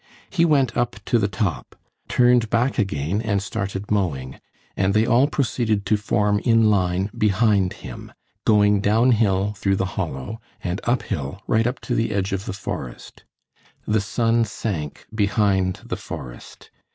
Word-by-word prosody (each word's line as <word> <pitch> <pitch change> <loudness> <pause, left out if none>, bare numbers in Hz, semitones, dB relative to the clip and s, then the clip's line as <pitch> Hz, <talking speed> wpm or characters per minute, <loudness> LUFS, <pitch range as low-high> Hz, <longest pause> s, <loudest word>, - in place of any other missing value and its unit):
He 170 -3 +3
went 135 -7 +2
up 120 0 0
to 120 - +2
the 100 - +1
top, 95 - -3 0.3
turned 125 -2 +3
back 120 +3 +1
again 95 0 -1
and 105 -3 0
started 100 0 -4
mowing, 70 -11 -1 0.4
and 95 +1 +1
they 110 +1 +4
all 120 +5 +4
proceeded 115 -8 0
to 105 - +3
form 105 0 +1
in 115 -2 +4
line 95 0 +1
behind 105 -3 +2
him, - - -9 0.3
going 105 -1 +4
downhill 105 -2 +2
through 100 -1 0
the 95 - 0
hollow 85 - -4 0.2
and 90 +2 -2
uphill 100 - -2
right 115 +2 +2
up 125 - -3
to 120 - -3
the 115 -2 0
edge 100 -1 -1
of 95 0 -3
the - - -3
forest. 95 - -7 0.6
The 105 0 +1
sun 115 +2 +1
sank 95 -8 -4
behind 100 -3 +1
the - - -4
forest. - - -9
105 Hz, 150 wpm, -22 LUFS, 95-115 Hz, 0.6 s, they